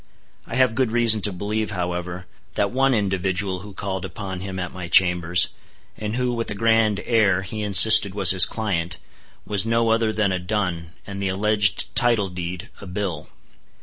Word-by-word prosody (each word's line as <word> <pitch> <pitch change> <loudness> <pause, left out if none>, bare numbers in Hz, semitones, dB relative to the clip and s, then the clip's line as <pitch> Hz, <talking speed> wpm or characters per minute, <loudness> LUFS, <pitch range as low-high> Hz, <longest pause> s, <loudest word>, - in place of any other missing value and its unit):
I - - -6
have 130 -3 +2
good 130 -2 -1
reason 115 -2 +3
to 105 - +3
believe, 105 +4 -4
however, 90 -1 -5 0.3
that 100 - -1
one 135 +1 +1
individual 95 -2 -2
who 100 +2 -11
called 95 -2 -5
upon 95 +1 -7
him 95 0 -7
at 90 -1 -5
my 90 -2 -7
chambers, 90 -1 +3 0.5
and 105 +1 -5
who, 125 -1 -1
with 115 -1 -3
a 105 - -5
grand 110 -1 +1
air, 100 -5 +1
he 105 +2 -7
insisted 100 -1 +6
was 95 -4 +6
his 95 -2 +5
client, 95 -7 -4 0.5
was 100 -2 -1
no 115 0 0
other 115 -1 +1
than 105 -2 -1
a 95 - -2
dun, 90 -3 -4
and 100 -1 -7
the 95 - -1
alleged 105 +2 0
title 115 -5 +1
deed, 90 0 -7
a 100 - -10
bill. 90 -5 -5
100 Hz, 180 wpm, -21 LUFS, 90-110 Hz, 0.5 s, insisted